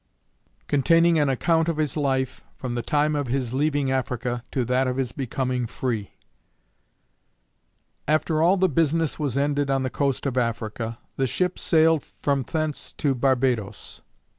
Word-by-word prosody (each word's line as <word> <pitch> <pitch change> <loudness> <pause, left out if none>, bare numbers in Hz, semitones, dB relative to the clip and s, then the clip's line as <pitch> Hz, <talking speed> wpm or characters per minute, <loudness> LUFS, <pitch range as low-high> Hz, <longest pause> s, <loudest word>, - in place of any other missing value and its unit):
Containing 165 +4 +4
an 145 -2 +2
account 165 +5 +2
of 165 - -1
his 150 -4 0
life, 130 -3 -1
from 125 -2 -5
the 120 - -1
time 150 +5 +1
of 145 -2 -1
his 125 -1 -1
leaving 145 -1 +1
Africa, 125 -2 -2
to 130 -3 -1
that 130 +2 +1
of 130 0 -2
his 130 -3 -1
becoming 125 -1 -2
free. 115 -4 -3 1.9
After 155 +1 +1
all 180 +4 +4
the 190 0 +3
business 165 0 +1
was 140 -4 -1
ended 145 0 +1
on 135 -1 +1
the 130 - -2
coast 140 -2 -1
of 130 -2 +1
Africa, 115 -1 -3 0.2
the 135 - +1
ship 180 +8 -1
sailed 160 -2 +3 0.2
from 140 -1 +2
thence 155 +2 -3
to 140 -2 0
Barbadoes. 125 -5 -1
135 Hz, 155 wpm, -24 LUFS, 125-155 Hz, 1.9 s, Containing